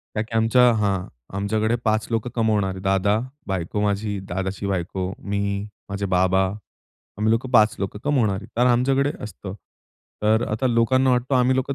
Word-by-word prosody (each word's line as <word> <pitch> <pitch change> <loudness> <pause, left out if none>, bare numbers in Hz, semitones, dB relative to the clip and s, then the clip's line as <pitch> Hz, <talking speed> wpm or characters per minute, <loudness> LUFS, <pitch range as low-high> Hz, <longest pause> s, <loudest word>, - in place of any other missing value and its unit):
काकी 110 +1 -3
आमच्या 115 +3 +4
हां, 100 -3 0 0.3
आमच्याकडे 110 +3 0
5 110 +1 +1
लोकं 115 +1 -1
कमावणारे. 105 -4 +1
दादा, 95 +2 +2 0.3
बायको 95 +2 -2
माझी, 105 0 -1
दादाची 95 +2 -3
बायको, 95 0 -2
मी, 100 0 -2 0.2
माझे 100 0 -3
बाबा. 95 +1 +2 0.7
आम्ही 110 +1 +2
लोकं 120 +3 -1
5 110 -4 +5
लोकं 100 +1 -4
कमावणारी 110 -8 +1
कारण 125 +1 +4
आमच्याकडे 135 +4 +2
असतं. 95 -1 -8 0.7
तर 110 +2 +3
आता 110 +5 0
लोकांना 130 +2 +3
वाटतं 125 +2 +1
आम्ही 125 +1 +3
लोकं 135 +1 -1
105 Hz, 150 wpm, -23 LUFS, 100-120 Hz, 0.7 s, 5